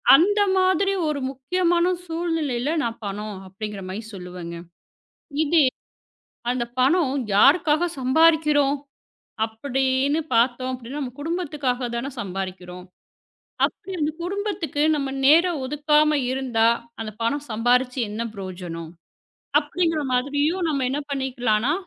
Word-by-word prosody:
அந்த 410 +8 +4 0.2
மாதிரி 375 +1 +3
ஒரு 300 -2 -1
முக்கியமான 340 +6 +1 0.2
சூழ்நிலையில 325 -6 -1
நான் 230 -1 -3
பணம் 205 +1 -4
அப்பிடிங்கிற 200 +1 -6
மாரி 200 +4 -4
சொல்லுவேங்க. 180 -2 -7 0.9
இதே 315 -1 +4 0.9
அந்தப் 240 -1 -3
பணம் 280 +1 +3 0.2
யாருக்காக 305 - +5 0.2
சம்பாரிக்கிறோம் 295 0 +4 0.7
அப்பிடின்னு 265 +5 0
பாத்தோம் 245 +2 +2
அப்பிடின்னா, 255 +3 -6
நம்ம 255 -3 -4
குடும்பத்துக்காகத்தான 275 -7 -2
சம்பாதிக்கிறோம். 185 -2 -6 0.8
அப்பிடி 385 - -3
அந்த 300 0 +1
குடும்பத்துக்கு 380 -5 -2
நம்ம 280 -2 -1 0.2
நேரம் 335 +2 +5
ஒதுக்காம 300 +2 +3
இருந்தா 255 -4 +1 0.3
அந்தப் 215 -1 -6
பணம் 285 +6 0
சம்பாரிச்சு 250 +3 +2
என்ன 215 +2 -3
பிரயோஜனம்? 175 -4 -7 0.7
அப்பிடிங்கிற 320 +1 0
மாதிரியும் 285 +8 +1
நம்ம 275 -4 0
என்ன 285 - -1
பண்ணிக்கலான்னா 255 -3 0
270 Hz, 105 wpm, -23 LUFS, 230-310 Hz, 0.9 s, யாருக்காக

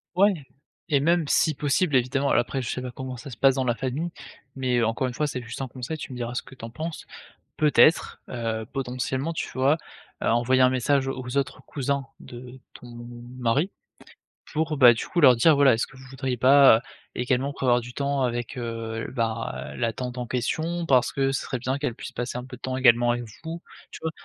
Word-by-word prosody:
Ouais 200 +2 +5 0.6
et 140 - +5
même 170 +2 +2
si 160 -2 +3
possible 150 +2 +1
évidemment 135 +3 +1
alors - - +4
après 130 +2 -3
je 115 - -4
sais 125 - -3
pas 125 - -5
comment 130 +1 -6
ça 140 +4 -9
se 125 - -9
passe 135 -1 +4
dans 130 - 0
la 120 -2 0
famille, 135 +8 -3 0.5
mais 125 -3 +1
encore 115 +4 0
une 125 - -5
fois 150 - -1
c'est 130 -3 -3
juste 120 +2 -7
un 130 - -4
conseil, 130 +5 -5
tu 140 - -7
me 125 - -7
diras 120 0 -4
ce - - -2
que - - -15
tu 115 - -9
en - - -7
penses. 160 +7 -6 0.5
Peut-être, 155 +2 +4
heu, 115 -2 -3
potentiellement 130 +3 -2
tu 160 - -4
vois, 135 +5 +2 0.4
heu, - - +1
envoyer 125 +3 +3
un 125 - +6
message 135 +1 +1
aux 130 0 -5
autres 140 - -1
cousins 140 -1 -2
de 125 +1 -11
ton 125 - -13 0.5
mari? 130 - +1 0.8
Pour 155 -1 -1
bah, 125 -3 +8
du 115 - -5
coup 175 - 0
leur 130 -5 +7
dire: 155 +7 +5
«Voilà 140 -4 +5
est-ce 115 - -1
que 135 - -17
vous 130 0 -13
voudriez 130 -1 -3
pas, 135 -1 +7
heu, - - -9 0.3
également 130 +3 0
prévoir 125 -3 +2
du 120 +1 -9
temps 140 0 0
avec, 120 0 -2
heu, 115 -1 -4
bah 115 -1 -3
la 115 -2 0
tante 125 +1 -5
en 120 - -3
question? 160 +8 -2
Parce 125 -4 +3
que 135 -1 +1
ce 135 - -1
serait 130 - -4
bien 130 +3 -2
qu'elle 140 -5 -2
puisse - - -8
passer 125 0 -4
un 125 - -6
peu 130 -1 -10
de - - -24
temps 130 0 -2
également 120 -2 +5
avec 120 - -3 0.2
vous», 165 +1 -6 0.3
tu - - -9
vois? 160 - -1
130 Hz, 225 wpm, -25 LUFS, 120-140 Hz, 0.8 s, bah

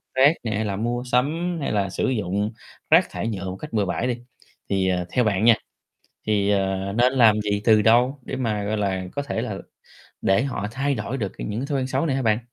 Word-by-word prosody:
rác 135 +4 +6
nè, 110 - -2
hay 110 +1 -1
là 100 -2 -2
mua 120 +4 -2
sắm, 165 +8 +1
hay - - -1
là 100 -2 0
sử 95 - -1
dụng 105 -3 -1 0.4
rác - - +5
thải - - -4
nhựa 100 -4 -4
một 95 - -5
cách 150 +8 -9
bừa 105 -2 +1
bãi 115 +6 -1
đi, 120 -2 -1 0.5
thì, 95 -1 +1
ờ, 90 -1 0
theo 125 - +2
bạn 105 -2 +1
nha, 115 -1 +7 0.7
thì, 105 -2 +2
ờ, 95 -1 0
nên 120 +4 +3
làm 115 -5 +5
gì 105 -1 -1
từ 110 -2 +5
đâu 125 +5 +4
để 130 - -5
mà, 110 -5 -1
gọi 105 +2 -1
là, 95 -3 -1
có 145 - -2
thể 140 - -3
là - - -4 0.7
để 95 +6 +3
họ 130 -7 -3
thay 135 +3 -1
đổi 130 +1 -4
được 105 -6 -3
cái - - -5
những 105 +2 -3
cái 135 - -4
thói 140 -2 0
quen 130 - -2
xấu 135 +4 0
này 140 -5 0
hả 135 - 0
bạn? 110 -3 +2
110 Hz, 245 wpm, -23 LUFS, 100-130 Hz, 0.7 s, nha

